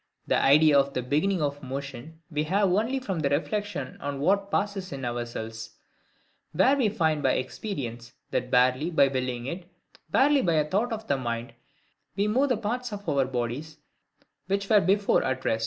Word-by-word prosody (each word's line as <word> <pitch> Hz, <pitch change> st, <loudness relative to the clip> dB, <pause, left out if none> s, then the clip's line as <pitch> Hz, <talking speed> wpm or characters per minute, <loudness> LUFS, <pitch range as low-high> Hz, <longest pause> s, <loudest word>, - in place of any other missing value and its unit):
The -, -, +2 dB
idea 150 Hz, +1 st, +6 dB
of 140 Hz, 0 st, -1 dB
the 125 Hz, -, -1 dB
BEGINNING 155 Hz, +7 st, +1 dB
of 145 Hz, 0 st, -2 dB
motion 140 Hz, +4 st, -7 dB
we 150 Hz, 0 st, -1 dB
have 195 Hz, +3 st, +2 dB
only 230 Hz, +7 st, +1 dB
from 195 Hz, -9 st, -3 dB
reflection 155 Hz, +2 st, -2 dB
on 140 Hz, 0 st, -4 dB
what 195 Hz, +6 st, +1 dB
passes 200 Hz, -2 st, -2 dB
in 135 Hz, -2 st, -5 dB
ourselves; 120 Hz, -2 st, -5 dB, 0.8 s
where 270 Hz, +2 st, +4 dB
we 255 Hz, -6 st, +2 dB
find 160 Hz, -7 st, 0 dB
by 135 Hz, -2 st, +2 dB
experience, 125 Hz, -, -4 dB, 0.2 s
that, 125 Hz, -, -1 dB
barely 130 Hz, +5 st, +3 dB
by 150 Hz, -5 st, +4 dB
willing 130 Hz, -2 st, -3 dB
it, 175 Hz, +5 st, -6 dB, 0.4 s
barely 280 Hz, -, +4 dB
by 170 Hz, -6 st, +1 dB
a 155 Hz, -2 st, +2 dB
thought 210 Hz, +9 st, 0 dB
of 220 Hz, -1 st, -4 dB
the 140 Hz, -, 0 dB
mind, 115 Hz, -2 st, -4 dB, 0.6 s
we 200 Hz, -, +1 dB
can 210 Hz, 0 st, 0 dB
move 275 Hz, +4 st, +2 dB
the 250 Hz, -, +2 dB
parts 240 Hz, +3 st, -3 dB
of 205 Hz, -1 st, -7 dB
our 140 Hz, -2 st, +2 dB
bodies, 130 Hz, +5 st, -4 dB, 0.7 s
which 195 Hz, +1 st, -1 dB
were 210 Hz, -2 st, +7 dB
before 200 Hz, +2 st, +2 dB
at 130 Hz, 0 st, -2 dB
rest. 110 Hz, -, +1 dB
155 Hz, 180 wpm, -27 LUFS, 130-200 Hz, 0.8 s, were